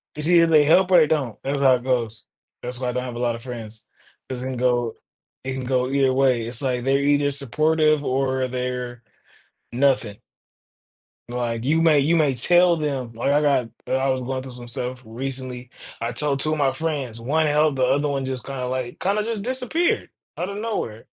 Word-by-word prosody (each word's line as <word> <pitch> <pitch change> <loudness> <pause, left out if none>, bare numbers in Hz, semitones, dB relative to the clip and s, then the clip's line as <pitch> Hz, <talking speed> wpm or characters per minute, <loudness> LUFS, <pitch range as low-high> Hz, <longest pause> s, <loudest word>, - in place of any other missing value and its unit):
It's 150 +1 -4
either 170 -1 +6
they 155 -2 +5
help 180 +5 +4
or 180 - +7
they 155 - +5
don't, 135 -9 -1
that's 140 +1 -1
how 130 -2 +6
it 120 - -5
goes. 120 -4 -1 0.4
That's 125 0 -6
why 125 -1 -1
I - - 0
don't 125 +1 -2
have 125 -2 -6
a - - -5
lot 120 -1 0
of 115 - -10
friends, 115 -3 -8 0.4
'cause 130 -1 -4
it - - -5
can 130 -1 -4
go 120 -2 +1 0.5
it 130 0 -3
can 130 -1 -4
go 125 0 0
either 135 -1 +2
way. 130 -3 +2
It's 120 0 -6
like 125 -3 -1
they're 135 +1 +3
either 145 0 +2
supportive 155 +2 +1
or 130 -1 0
they're 125 -1 -4 0.7
nothing. 125 -5 +1 1.1
Like 120 -1 -3
you 160 +4 +2
may 160 -3 +5
you 150 +5 +2
may 150 -5 +2
tell 175 +6 +4
them, 140 -6 -3
like 115 +4 -1
I 145 +1 +3
got 140 -5 +2 0.2
I 130 +1 0
was 130 -1 0
going 130 +1 -3
through 130 -1 -9
some 120 -1 -10
stuff 125 +2 -5
recently. 125 +1 -6 0.3
I 115 +1 -3
told 145 -2 -1
two 155 +2 0
of - - -1
my 140 -2 +2
friends, 135 -5 -3
one 150 +7 +1
held, 150 0 +2
the 130 - +1
other 145 +3 +2
one 140 -2 -1
just 130 -1 -5
kinda 135 -2 -4
like, 125 -1 -3
kinda 200 +3 +1
just 220 -2 -3
disappeared 260 +8 -1 0.3
out 175 - -2
of 200 - -6
nowhere. 205 - -4
130 Hz, 210 wpm, -23 LUFS, 125-150 Hz, 1.1 s, or